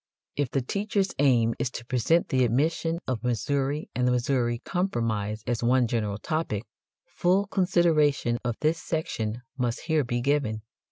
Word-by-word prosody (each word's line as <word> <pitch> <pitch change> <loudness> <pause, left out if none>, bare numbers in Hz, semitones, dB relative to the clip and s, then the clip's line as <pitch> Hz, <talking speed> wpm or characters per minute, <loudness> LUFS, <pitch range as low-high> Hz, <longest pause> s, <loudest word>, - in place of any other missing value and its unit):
If 145 -3 0
the 135 0 -1
teacher's 200 - -1
aim 120 -5 +4
is 130 - 0
to 120 -2 -8
present 130 +8 +2
the 130 -1 +3
admission 160 +7 +1
of 125 -3 -2
Missouri 140 +5 -1
and 125 0 +1
the - - +3
Missouri 125 -1 +1
Compromise 110 - -1
as 120 -1 -1
one 125 +1 +3
general 110 -3 -1
topic, 155 -7 -2 0.4
full 185 +3 +1
consideration 165 - +2
of 120 -2 -1
this 155 +2 +1
section 120 -8 -3 0.2
must 120 0 -1
here 160 -3 +1
be 120 -1 -2
given. 120 -5 0
130 Hz, 155 wpm, -27 LUFS, 120-160 Hz, 0.4 s, aim